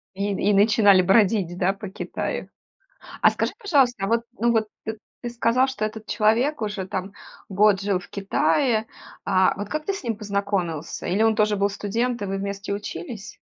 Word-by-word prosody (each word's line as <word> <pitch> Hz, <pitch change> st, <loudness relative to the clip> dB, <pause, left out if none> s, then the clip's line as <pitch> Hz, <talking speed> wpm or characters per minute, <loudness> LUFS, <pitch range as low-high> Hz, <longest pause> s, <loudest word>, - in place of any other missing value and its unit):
И 200 Hz, +1 st, -1 dB
и 200 Hz, +2 st, +1 dB
начинали 205 Hz, -1 st, +5 dB
бродить, 190 Hz, -2 st, +2 dB
да, 185 Hz, +1 st, +2 dB
по 200 Hz, 0 st, -8 dB
Китаю? 190 Hz, -, -4 dB, 0.7 s
А -, -, +7 dB
скажи, -, -, -2 dB
пожалуйста, 260 Hz, -, +2 dB
вот, 230 Hz, +2 st, +1 dB
ну, 235 Hz, -1 st, +1 dB
вот 220 Hz, -2 st, +1 dB, 0.2 s
т 220 Hz, 0 st, -4 dB, 0.3 s
ты 240 Hz, -, -4 dB
сказал, 240 Hz, +3 st, +2 dB
что 215 Hz, -5 st, -2 dB
этот 215 Hz, 0 st, -8 dB
человек 235 Hz, +7 st, +2 dB
уже 205 Hz, -3 st, -3 dB
там 190 Hz, +1 st, -4 dB, 0.4 s
год 200 Hz, 0 st, +3 dB
жил 195 Hz, -2 st, 0 dB
в 180 Hz, -, -13 dB
Китае, 215 Hz, -, +1 dB, 0.4 s
а 185 Hz, 0 st, +3 dB
вот, 205 Hz, 0 st, -6 dB
как 305 Hz, 0 st, -3 dB
ты 395 Hz, -, 0 dB
с 390 Hz, -, -7 dB
ним 230 Hz, -3 st, -2 dB
познакомился? 200 Hz, -6 st, -3 dB
Или 195 Hz, +5 st, +1 dB
он 225 Hz, 0 st, +4 dB
тоже 210 Hz, -1 st, +2 dB
был 200 Hz, +1 st, +1 dB
студент 230 Hz, +5 st, -2 dB
и -, -, -2 dB
вы 195 Hz, 0 st, -2 dB
вместе 200 Hz, 0 st, -4 dB
учились? 210 Hz, -, -7 dB
210 Hz, 180 wpm, -24 LUFS, 195-230 Hz, 0.7 s, А